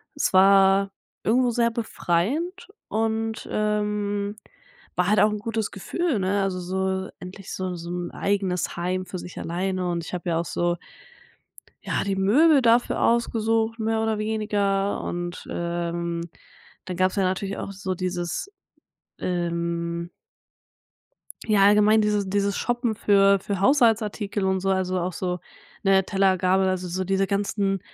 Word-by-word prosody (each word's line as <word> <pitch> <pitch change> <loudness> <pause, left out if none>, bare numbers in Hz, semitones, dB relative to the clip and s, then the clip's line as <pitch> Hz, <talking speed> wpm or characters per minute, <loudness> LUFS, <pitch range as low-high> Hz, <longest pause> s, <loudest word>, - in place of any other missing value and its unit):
es 290 - 0
war 195 +1 +5 0.3
irgendwo 250 +3 +3
sehr 235 0 +2
befreiend 265 - -2 0.2
und, 225 0 -1
ähm, 210 -1 -1 0.6
war 180 0 +1
halt 210 - +4
auch 210 - +5
'n 210 - -3
gutes 220 0 -2
Gefühl, 265 - -2
ne, 195 +2 +1
also 190 -1 -1
so 190 +1 -2
endlich 190 +1 -9
so 185 -1 -3
so 170 0 -8
'n 175 0 -4
eigenes 195 -3 -1
Heim 185 +2 -2
für 185 - -6
sich 180 - -10
alleine 185 +1 -2
und 170 -1 -3
ich - - -9
habe 175 0 -3
ja 165 -1 +1
auch 170 - -2
so 175 +1 -1 1.1
ja, - - -1
die 195 -1 -1
Möbel 270 +10 +5
dafür 235 0 +3
ausgesucht, 225 -1 +1
mehr 220 0 0
oder 220 -1 0
weniger, 205 -2 0
und, 175 0 -5
ähm, 170 0 -2 0.6
dann 180 -2 -5
gab's 185 0 +2
ja 195 - +1
natürlich 190 +1 -1
auch - - -5
so 190 -1 -4
dieses, 180 - -3 0.7
ähm 170 -1 -2 1.3
ja, 210 -3 +4
allgemein 210 +1 +5
dieses 210 -2 +1
dieses 200 0 0
Shoppen 240 -2 -1
für 200 -1 +4
für 195 0 -3
Haushaltsartikel 220 -4 +2
und 190 0 +1
so, 195 - 0
also, 185 -1 0
auch 180 +1 -2
so, 180 0 -3 0.4
ne, 195 0 +4
Teller, 195 -1 +2
Gabel, 190 +1 +2
also 185 -1 -1
so 185 +2 -2
diese 195 +1 +1
ganzen 200 -1 0
195 Hz, 150 wpm, -24 LUFS, 185-215 Hz, 1.3 s, war